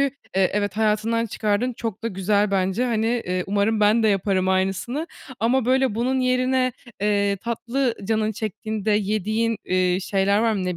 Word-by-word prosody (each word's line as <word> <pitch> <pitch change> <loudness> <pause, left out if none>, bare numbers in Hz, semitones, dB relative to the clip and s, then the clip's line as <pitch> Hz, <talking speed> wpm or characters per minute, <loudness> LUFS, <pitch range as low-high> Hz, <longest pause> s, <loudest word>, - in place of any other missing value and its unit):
eee, 270 -9 0
evet 205 -1 -1
hayatından 220 +1 +1
çıkardın, 215 +3 -1
çok 225 -3 -5
da 230 - -1
güzel 200 +1 +1
bence. 190 +4 +1
Hani, 230 0 0
ııı, 180 0 0
umarım 205 +2 +1
ben 210 +2 +4
de 220 - +4
yaparım 195 -2 +1
aynısını 195 - -1 0.3
ama 235 +2 +2
böyle 260 -2 +2
bunun 255 +4 0
yerine, 255 0 +1 0.3
ııı, 200 -1 +2
tatlı 235 +4 -2
canın 215 +1 0
çektiğinde 215 0 -3
yediğin, 215 +2 0
ııı, 185 0 +2
şeyler 195 +1 +1
var 225 +1 +2
mı? 195 -3 -2
Ne 180 -1 -2
215 Hz, 160 wpm, -23 LUFS, 200-235 Hz, 0.3 s, ben